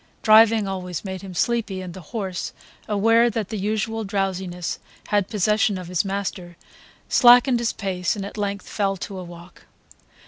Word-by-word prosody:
Driving 220 -1 +6
always 180 -2 -5
made 190 -1 -5
him 190 -2 -9
sleepy, 220 -1 0
and 185 -2 -7
the 190 - -9
horse, 190 0 -5 0.3
aware 225 +3 +4
that 220 -3 -3
the 220 - -4
usual 220 +2 -2
drowsiness 190 -3 -3 0.3
had 205 -2 +1
possession 210 -1 +1
of 180 -2 -8
his 180 -2 +1
master, 190 -3 -4 0.5
slackened 245 0 +6
his 235 0 0
pace 185 -2 -2
and 200 -2 -5
at 200 - -8
length 200 -1 -3
fell 195 -2 -1
to 190 +1 -6
a - - -6
walk. 175 0 -13
200 Hz, 165 wpm, -23 LUFS, 185-220 Hz, 0.5 s, Driving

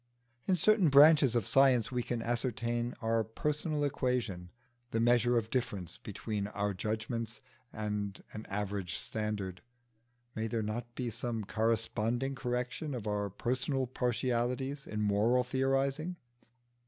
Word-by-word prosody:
In 190 - +4
certain 195 0 +4
branches 140 -2 +7
of 115 -5 +2
science 135 -3 +4
we 125 -1 0
can 120 -1 -3
ascertain 120 0 -1
our 115 0 +2
personal 150 - -1
equation, 125 -10 -1 0.4
the 115 - -1
measure 120 +1 +4
of 115 -1 -1
difference 100 -9 -2
between 105 -2 -4
our 105 0 -1
own 100 - -5
judgments 115 +2 -3 0.3
and 105 -2 -3
an 110 - -7
average 100 -2 -2
standard: 105 -4 -3 0.7
may 110 0 -2
there 115 0 -1
not 120 +3 -4
be 125 -3 -2
some 115 0 -3
corresponding 115 +4 0
correction 125 +2 -3
of 115 -4 -5
our 105 -1 -1
personal 130 +6 -1
partialities 125 +2 -1
in 105 0 -3
moral 105 +5 +3
theorising? 135 +6 0
120 Hz, 130 wpm, -32 LUFS, 105-130 Hz, 0.7 s, branches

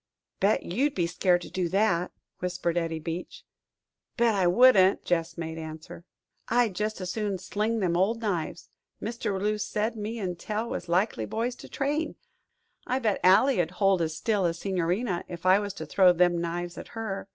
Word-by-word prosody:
"Bet 205 +3 +2
you'd 270 +11 0
be 175 - +1
scared 175 +1 +2
to - - -10
do 180 -2 -1
that," 180 -2 +1 0.3
whispered 180 -1 -2
Eddie 165 -2 -1
Beach. 165 +2 -6 0.7
"Bet 235 -1 +3
I 190 -3 +2
wouldn't," 195 -1 +5
Gess 165 -1 -1
made 160 -1 -5
answer. 160 +1 -9 0.4
"I'd 235 -3 +2
jest 210 +2 -3
as 180 -1 -3
soon 210 -2 -2
sling 210 +5 -2
them 175 -3 +1
old 200 +6 +2
knives 185 -8 -3 0.3
Mr. 230 +1 -3
La - - -1
Rue 210 0 +1
said 215 +2 -1
me 220 +2 -4
an' 185 -5 -3
Tell 215 +5 -3
was 175 - -5
likely 175 - +1
boys 230 - -2
to - - -12
train. 295 +3 -1 0.7
I 255 - +1
bet 220 -6 0
Ally'd 185 -1 +5
hold 195 -1 +2
as 160 -1 -2
still 205 0 +1
as 170 0 -2
the - - -12
Signorina 185 +1 -1
'f 175 0 -8
I 185 +2 +6
was 205 -1 -4
to - - -6
throw 185 -2 +5
them 175 -1 +3
knives 175 +1 -4
at - - -9
her." 200 -4 -4
190 Hz, 185 wpm, -27 LUFS, 175-215 Hz, 0.7 s, I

